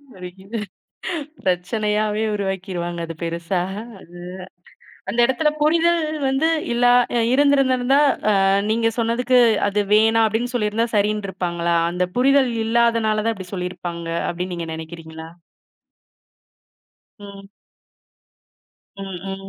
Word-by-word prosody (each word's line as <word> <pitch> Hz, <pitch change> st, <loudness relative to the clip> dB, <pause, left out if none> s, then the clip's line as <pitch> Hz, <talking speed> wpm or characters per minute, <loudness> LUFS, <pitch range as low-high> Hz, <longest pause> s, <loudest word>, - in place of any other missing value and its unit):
வலிக்குது. 190 Hz, +4 st, -8 dB, 0.9 s
பிரச்சனையாவே 210 Hz, +3 st, 0 dB
உருவாக்கிறுவாங்க. 185 Hz, -3 st, -3 dB
ஆ, -, -, -6 dB
அது 165 Hz, -, -7 dB
பெருசா 170 Hz, +2 st, -2 dB, 1.5 s
அந்த 210 Hz, -, -4 dB
எடத்துல 265 Hz, +5 st, +1 dB
புரிதல் 335 Hz, +3 st, +3 dB, 0.3 s
வந்து 270 Hz, +4 st, +1 dB, 0.3 s
இல்லா 245 Hz, +1 st, +4 dB, 0.3 s
ஆ -, -, +2 dB
இருந்திருந்திருந்தா, 270 Hz, -1 st, +3 dB, 0.3 s
அ -, -, +3 dB, 0.4 s
நீங்க 225 Hz, +1 st, +2 dB
சொன்னதுக்கு 245 Hz, +2 st, +1 dB, 0.3 s
அது 205 Hz, +1 st, +1 dB
வேணாம் 225 Hz, +1 st, +4 dB
அப்டின்னு 230 Hz, +4 st, -1 dB
சொல்லிருந்தா 220 Hz, 0 st, 0 dB
சரின்டிருப்பாங்களா? 190 Hz, -5 st, -1 dB, 0.2 s
அந்த 180 Hz, +1 st, 0 dB
புரிதல் 270 Hz, 0 st, +4 dB
இல்லாதனால 225 Hz, -2 st, +2 dB
தான் 230 Hz, 0 st, 0 dB
இப்படி 190 Hz, -2 st, -10 dB
சொல்லிருப்பாங்க 175 Hz, -2 st, -5 dB, 0.2 s
அப்டின்னு 180 Hz, +1 st, -4 dB
நீங்க 170 Hz, -1 st, -5 dB
நெனைக்கிறீங்களா? 160 Hz, 0 st, -9 dB, 1.9 s
ம். 200 Hz, -1 st, -11 dB, 1.5 s
ம் 190 Hz, -2 st, -6 dB
ம். 195 Hz, 0 st, -7 dB
210 Hz, 100 wpm, -21 LUFS, 180-235 Hz, 1.9 s, இல்லா